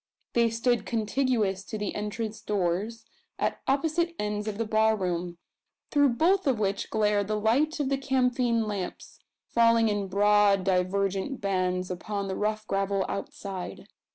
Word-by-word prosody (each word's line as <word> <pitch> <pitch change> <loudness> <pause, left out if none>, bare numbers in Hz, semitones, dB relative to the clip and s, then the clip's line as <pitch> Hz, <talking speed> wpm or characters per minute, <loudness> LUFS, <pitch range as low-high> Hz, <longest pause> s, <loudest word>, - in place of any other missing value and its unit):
They 235 -1 +3
stood 235 +1 0
contiguous 220 -4 0
to 215 - -5
the 210 -1 -3
entrance 215 +1 -4
doors, 210 +3 -1 0.3
at - - -1
opposite 320 +5 +1
ends 210 0 -2
of 210 -2 -3
the 230 - -1
bar 220 0 +3
room, 175 -3 -3 0.5
through 285 -5 +3
both 365 +5 +3
of 260 -4 +3
which 200 -2 -1
glared 210 -2 +1
the 215 0 -1
light 280 +10 +2
of 280 -2 0
the 275 -1 0
camphine 250 -3 +1
lamps 200 -4 -5 0.3
falling 230 -1 +4
in 205 -1 -1
broad 205 0 +4
divergent 195 +5 0
bands 185 -2 -1
upon 200 +2 -3
the 190 - -3
rough 215 +1 -1
gravel 195 -1 0
outside. 195 -2 -6
210 Hz, 150 wpm, -27 LUFS, 195-235 Hz, 0.5 s, falling